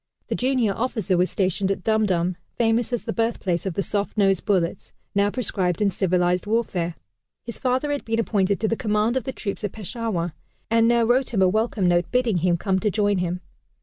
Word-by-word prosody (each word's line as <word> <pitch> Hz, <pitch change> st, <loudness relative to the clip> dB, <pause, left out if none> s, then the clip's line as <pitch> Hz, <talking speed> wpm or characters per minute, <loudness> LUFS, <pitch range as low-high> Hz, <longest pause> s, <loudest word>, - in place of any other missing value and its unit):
The -, -, 0 dB
junior 250 Hz, -5 st, +1 dB
officer 220 Hz, -4 st, -1 dB
was 180 Hz, +1 st, +2 dB
stationed 190 Hz, 0 st, 0 dB
at 195 Hz, -2 st, -2 dB
Dum 220 Hz, -1 st, +2 dB
Dum, 180 Hz, -1 st, 0 dB, 0.2 s
famous 230 Hz, +1 st, +1 dB
as 240 Hz, -, -1 dB
the 225 Hz, -, -3 dB
birthplace 200 Hz, -6 st, -1 dB
of 180 Hz, -, -3 dB
the 200 Hz, -, 0 dB
soft 205 Hz, +4 st, -2 dB
nosed 195 Hz, -3 st, +2 dB
bullets, 185 Hz, -4 st, 0 dB, 0.2 s
now 200 Hz, 0 st, +3 dB
proscribed 190 Hz, -7 st, -1 dB
in 205 Hz, -2 st, +2 dB
civilized 180 Hz, 0 st, +1 dB
warfare. 190 Hz, -7 st, -1 dB, 0.5 s
His 235 Hz, -, -7 dB
father 260 Hz, +3 st, 0 dB
had 285 Hz, -, -2 dB
been 225 Hz, 0 st, -1 dB
appointed 200 Hz, -3 st, +1 dB
to 220 Hz, -, +2 dB
the 225 Hz, -, +1 dB
command 215 Hz, +1 st, 0 dB
of 260 Hz, -, -1 dB
the 265 Hz, -, -2 dB
troops 205 Hz, -5 st, -5 dB
at 205 Hz, -, -2 dB
Peshawar, 205 Hz, -5 st, -3 dB, 0.4 s
and 230 Hz, 0 st, +4 dB
now 235 Hz, 0 st, +4 dB
wrote 245 Hz, +1 st, +1 dB
him 190 Hz, -, +4 dB
a -, -, +5 dB
welcome 215 Hz, -1 st, +1 dB
note 175 Hz, 0 st, +2 dB
bidding 250 Hz, -6 st, +2 dB
him 175 Hz, +1 st, +2 dB
come 190 Hz, +1 st, 0 dB
to 210 Hz, -, +1 dB
join 205 Hz, -1 st, +1 dB
him. 180 Hz, 0 st, -2 dB
205 Hz, 210 wpm, -24 LUFS, 185-230 Hz, 0.5 s, a